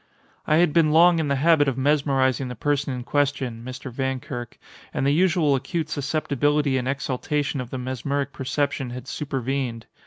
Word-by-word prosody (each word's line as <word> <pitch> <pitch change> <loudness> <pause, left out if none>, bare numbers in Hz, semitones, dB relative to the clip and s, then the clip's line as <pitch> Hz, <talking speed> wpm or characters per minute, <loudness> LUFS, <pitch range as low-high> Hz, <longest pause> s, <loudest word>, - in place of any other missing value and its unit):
I 155 - +4
had 165 -2 +3
been 165 -3 +4
long 170 +2 +6
in 155 - 0
the 140 - +1
habit 150 +1 +4
of 135 -2 0
mesmerizing 135 -2 +2
the 125 - -6
person 145 +3 0
in 125 -1 -4
question 135 -5 -1
(Mr. 130 +1 -7
Vankirk), 130 -1 -4 0.3
and - - -1
the 140 - +3
usual 165 -3 +3
acute 150 +4 -2
susceptibility 145 -1 0
and 125 - -4
exaltation 140 +1 -1
of 125 - -7
the 130 - -5
mesmeric 135 +2 -3
perception 135 0 -2
had 125 +1 -8
supervened. 135 -4 -3
140 Hz, 165 wpm, -24 LUFS, 130-150 Hz, 0.3 s, long